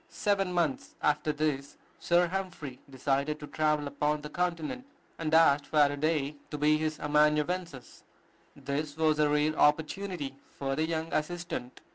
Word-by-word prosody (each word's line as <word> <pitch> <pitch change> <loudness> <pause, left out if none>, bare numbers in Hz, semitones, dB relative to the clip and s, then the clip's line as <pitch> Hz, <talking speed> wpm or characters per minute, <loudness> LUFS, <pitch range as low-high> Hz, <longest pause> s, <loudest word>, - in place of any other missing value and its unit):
Seven 195 -3 0
months 170 -6 -1
after 150 +1 +2
this, 145 -2 -2 0.2
Sir 175 +1 +3
Humphry 175 -8 -5
decided 140 +3 -1
to 150 - -7
travel 150 0 0
upon 150 +1 -1
the 150 - -8
Continent, 175 - -2 0.3
and 160 -2 -2
asked 155 -3 +5
Faraday 145 0 +2
to 150 - -4
be 150 +1 +4
his 155 0 -2
amanuensis. 150 0 0 0.5
This 145 +1 -4
was 155 -1 +2
a 150 -1 +4
rare 150 +1 +2
opportunity 155 0 +1 0.2
for 135 -1 -1
the 155 +2 0
young 160 0 -3
assistant. 155 -6 -3
150 Hz, 140 wpm, -30 LUFS, 145-165 Hz, 0.5 s, asked